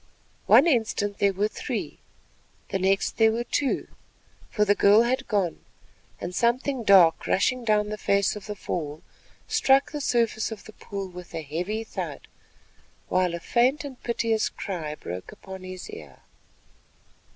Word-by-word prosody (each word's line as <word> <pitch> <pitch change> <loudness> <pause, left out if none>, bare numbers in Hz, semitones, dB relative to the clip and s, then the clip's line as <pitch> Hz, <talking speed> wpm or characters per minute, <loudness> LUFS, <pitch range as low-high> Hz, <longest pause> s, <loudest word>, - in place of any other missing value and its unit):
One 280 - +7
instant 220 -8 0
there 200 -1 +4
were 200 +2 0
three, - - -5 0.7
the 195 - -1
next 195 +2 +1
there 225 -1 +5
were 235 +2 -1
two—for 240 -5 -3
the 205 - +4
girl 205 +2 +5
had 250 +2 -1
gone, 195 -6 0 0.6
and 175 - -5
something 240 +4 0
dark 185 -6 +5
rushing 250 +6 +1
down 210 -2 +2
the 210 0 -5
face 200 0 +2
of 210 - -9
the 210 - -4
fall, 155 -6 -5 0.4
struck 270 +1 +3
the 295 -1 -4
surface 230 -4 0
of 220 - -7
the 220 - -13
pool 200 -2 -6
with 180 -1 -10
a 160 - -4
heavy 180 +9 -3
thud, 225 - -6 0.9
while 180 -2 +1
a - - -5
faint 255 - +2
and 270 -3 -9
piteous 230 -2 0
cry 160 -7 -5
broke 90 - -7
upon 190 -1 -10
his 185 0 -8
ear. 70 -4 -11
205 Hz, 150 wpm, -26 LUFS, 185-235 Hz, 0.9 s, One